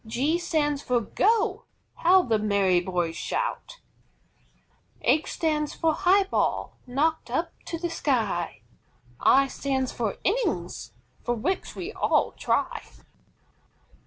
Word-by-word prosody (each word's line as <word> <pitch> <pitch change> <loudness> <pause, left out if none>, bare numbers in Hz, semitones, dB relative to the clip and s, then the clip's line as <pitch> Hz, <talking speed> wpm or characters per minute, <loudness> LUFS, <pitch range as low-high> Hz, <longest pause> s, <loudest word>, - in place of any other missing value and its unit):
G 280 +9 0
stands 295 -4 0
for 250 -3 +1
"GO" 435 - +1 0.3
How 365 +2 +5
the 225 -6 +1
merry 200 -4 +3
boys 175 -2 -2
shout! - - -3 1.2
H 315 - +2
stands 300 -2 -1
for 320 -1 +1
HIGH 390 +4 +4
BALL, - - 0
knocked 305 +6 0
up - - -1
to 335 - -4
the 340 0 -3
sky. 200 - -1 0.6
I 275 +1 +5
stands 265 -1 -2
for 225 -4 -2
INNINGS, 465 +6 -1 0.3
for 240 - -1
which 330 - -2
we 375 +4 -5
all - - +2
try. - - -1
295 Hz, 120 wpm, -26 LUFS, 225-350 Hz, 1.2 s, How